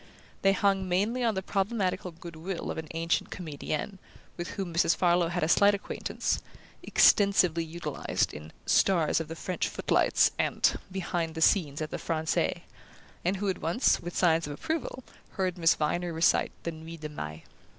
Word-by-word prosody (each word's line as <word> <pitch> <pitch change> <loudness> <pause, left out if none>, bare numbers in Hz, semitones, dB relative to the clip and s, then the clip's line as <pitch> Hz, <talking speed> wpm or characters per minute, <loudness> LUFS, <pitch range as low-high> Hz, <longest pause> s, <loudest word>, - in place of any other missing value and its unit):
They 195 0 +4
hung 195 -1 +1
mainly 210 +8 +1
on 225 -3 +1
the 190 - -2
problematical 195 -2 -1
good 170 0 -11
will 170 +3 -4
of - - -4
an 160 - -7
ancient 165 +1 0
comedienne, 160 +3 -5 0.4
with 175 - -5
whom 190 -4 -4
Mrs. 165 -1 +3
Farlow 175 0 +3
had 175 0 -2
a - - +2
slight 200 +4 +5
acquaintance 200 - -2 0.4
(extensively 185 -5 +4
utilized 165 +2 -2
in 75 +1 -9
"Stars 170 -6 +3
of 160 - -4
the 165 - -6
French 180 +2 -2
Footlights" - - +2
and - - +2
"Behind 175 -3 -2
the - - -4
Scenes 155 -4 +3
at 155 - -6
the - - -4
Francais"), 160 -1 -1 0.6
and 185 +3 0
who 205 - -3
had 190 -2 -1
once, 170 +11 +2
with 175 +1 -6
signs 165 -3 +3
of 145 - -5
approval, 315 - -4 0.3
heard 185 -2 -1
Miss 165 -2 +4
Viner 175 +3 -1
recite 165 +1 +2
the 170 - -2
Nuit 160 0 -10
de 155 - -5
Mai. 80 - -7
175 Hz, 170 wpm, -29 LUFS, 160-190 Hz, 0.6 s, slight